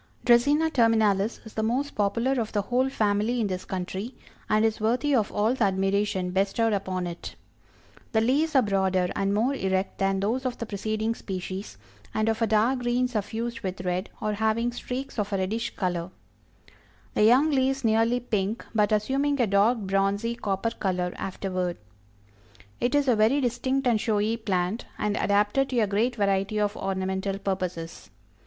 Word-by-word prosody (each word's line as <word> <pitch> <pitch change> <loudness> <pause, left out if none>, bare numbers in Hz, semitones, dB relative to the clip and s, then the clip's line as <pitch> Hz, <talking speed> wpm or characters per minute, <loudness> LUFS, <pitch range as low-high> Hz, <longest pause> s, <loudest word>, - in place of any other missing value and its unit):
Dracæna 290 +7 +4
terminalis 220 -4 +2
is 220 - -11
the 220 - -2
most 255 +6 -1
popular 230 +5 +1
of 220 - -4
the 205 -2 +1
whole 250 +5 +1
family 215 0 +1
in 225 - +1
this 185 -2 -3
country, 190 +6 -4 0.3
and 215 +1 +3
is 220 -1 0
worthy 250 +7 +1
of 220 -5 +2
all 215 +3 +1
the 245 -5 +1
admiration 195 -1 0
bestowed 200 +4 +1
upon 185 -2 -2
it. 175 -1 -7 0.8
The 220 - +3
leaves 285 +7 +1
are 265 - +6
broader 190 -3 +1
and 195 0 0
more 225 +7 +1
erect 190 -5 -1
than 195 0 +1
those 225 +7 -1
of 255 -2 -2
the 230 - -4
preceding 215 +2 -2
species, 185 - -6 0.4
and 215 +1 +1
of 225 +1 -1
a 225 - +3
dark 220 +5 +2
green 245 +1 +1
suffused 230 +1 -3
with 185 -1 -4
red, 180 +1 -2
or 215 - -1
having 220 +3 0
streaks 250 +1 -5
of 205 0 -2
a - - +2
reddish 220 +5 -2
color; 175 -2 -2 1.0
the - - +2
young 260 +8 +5
leaves 270 0 +1
nearly 225 +2 +3
pink, 215 -2 -2
but 210 -2 +2
assuming 270 +7 +1
a 240 - +4
dark 205 +4 +3
bronzy 200 +2 0
copper 210 -1 -2
color 180 -4 -2
afterward. 185 -2 -3 1.0
It 245 +3 +1
is 290 -1 +2
a 245 - +4
very 220 +6 +3
distinct 260 +2 0
and 230 -4 +2
showy 215 0 +1
plant, 200 -1 -1
and 210 0 -1
adapted 205 +8 +2
to 250 - +1
a - - +4
great 215 +5 0
variety 200 0 0
of 205 0 0
ornamental 190 0 -2
purposes. 180 -4 -4
215 Hz, 170 wpm, -26 LUFS, 195-240 Hz, 1.0 s, are